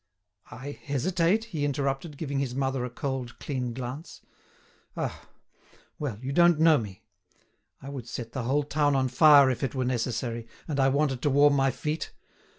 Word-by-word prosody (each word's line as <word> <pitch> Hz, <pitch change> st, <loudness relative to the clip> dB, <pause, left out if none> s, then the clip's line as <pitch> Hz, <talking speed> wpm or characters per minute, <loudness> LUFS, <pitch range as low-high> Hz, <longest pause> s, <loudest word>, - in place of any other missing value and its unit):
"I 130 Hz, +6 st, -7 dB
hesitate?" 170 Hz, -, 0 dB
he 165 Hz, -11 st, -4 dB
interrupted, 140 Hz, +2 st, -2 dB
giving 140 Hz, -3 st, -3 dB
his 130 Hz, -3 st, -2 dB
mother 135 Hz, -1 st, -1 dB
a 125 Hz, -, -3 dB
cold, 130 Hz, -1 st, -4 dB
keen 125 Hz, -4 st, -3 dB
glance. 130 Hz, +6 st, -7 dB, 0.8 s
"Ah! -, -, -5 dB, 0.7 s
well, 135 Hz, -9 st, -3 dB
you 135 Hz, -, -3 dB
don't 170 Hz, +1 st, +5 dB
know 160 Hz, -2 st, +6 dB
me. 105 Hz, -1 st, -8 dB, 0.8 s
I 135 Hz, -, -7 dB
would 130 Hz, -4 st, -7 dB
set 120 Hz, -1 st, -6 dB
the 130 Hz, -, -3 dB
whole 145 Hz, +4 st, +1 dB
town 145 Hz, 0 st, +1 dB
on 130 Hz, -1 st, +1 dB
fire 140 Hz, 0 st, +7 dB
if 125 Hz, -, -4 dB
it 135 Hz, -, -2 dB
were 130 Hz, -1 st, 0 dB
necessary, 120 Hz, -1 st, -2 dB, 0.2 s
and 145 Hz, -3 st, -2 dB
I 135 Hz, 0 st, +4 dB
wanted 135 Hz, -2 st, 0 dB
to 145 Hz, -, +1 dB
warm 145 Hz, +1 st, +5 dB
my 135 Hz, -1 st, +3 dB
feet. 150 Hz, +5 st, -4 dB
135 Hz, 170 wpm, -27 LUFS, 125-145 Hz, 0.8 s, fire